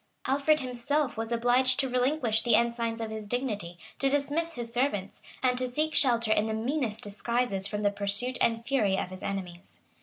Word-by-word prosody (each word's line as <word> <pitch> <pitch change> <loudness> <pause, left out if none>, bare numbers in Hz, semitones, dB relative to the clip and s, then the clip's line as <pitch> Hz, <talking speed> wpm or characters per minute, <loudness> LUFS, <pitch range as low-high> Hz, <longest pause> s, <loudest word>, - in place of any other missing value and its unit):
Alfred 285 +3 +2
himself 255 +2 -1
was 225 +1 -4
obliged 245 +3 +3
to 270 - +2
relinquish 250 -3 +1
the 235 -1 +3
ensigns 235 -1 0
of 220 -1 -4
his 215 -1 -6
dignity, 210 -8 -3 0.2
to 275 - +3
dismiss 290 +4 -1
his 235 -1 -5
servants, 235 -6 -1 0.2
and 250 -1 +3
to 255 0 -1
seek 310 +5 -1
shelter 235 -5 +3
in 215 +1 +1
the 220 - -2
meanest 235 -1 -2
disguises 210 -1 -1
from 210 0 -3
the 205 -1 +2
pursuit 205 +5 -1
and 230 0 +1
fury 215 -9 +1
of 185 - -3
his 185 0 -9
enemies. 185 -2 -6
235 Hz, 185 wpm, -28 LUFS, 210-260 Hz, 0.2 s, obliged